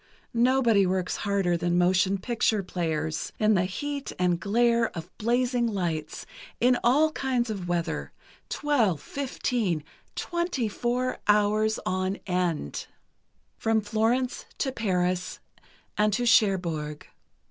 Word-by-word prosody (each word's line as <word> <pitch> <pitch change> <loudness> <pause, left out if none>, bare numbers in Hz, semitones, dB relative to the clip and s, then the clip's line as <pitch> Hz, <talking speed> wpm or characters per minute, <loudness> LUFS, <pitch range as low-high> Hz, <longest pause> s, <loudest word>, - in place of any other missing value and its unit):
Nobody 235 -4 +4
works 185 0 -1
harder 195 -4 +1
than 175 +1 0
motion 185 +2 +3
picture 220 -1 0
players—in 165 +4 -1
the 185 -2 +2
heat 280 +9 -4
and 180 -1 +1
glare 235 +3 +2
of 165 +2 -8
blazing 240 +1 +1
lights, 170 -7 -3 0.3
in 250 +1 +4
all 295 +6 +4
kinds 255 -5 -1
of 190 -4 -5
weather—twelve, 190 - -1
fifteen, 230 - -2 0.3
twenty 345 -9 -1
four 245 +4 -1
hours 210 +1 +3
on 185 +1 0
end. 180 - -2 0.7
"From 225 0 +2
Florence 225 +4 0
to 265 - -1
Paris, 180 -6 -1 0.6
and 210 0 +4
to 245 +3 0
Cherbourg. 175 -10 +2
210 Hz, 110 wpm, -27 LUFS, 180-240 Hz, 0.7 s, Nobody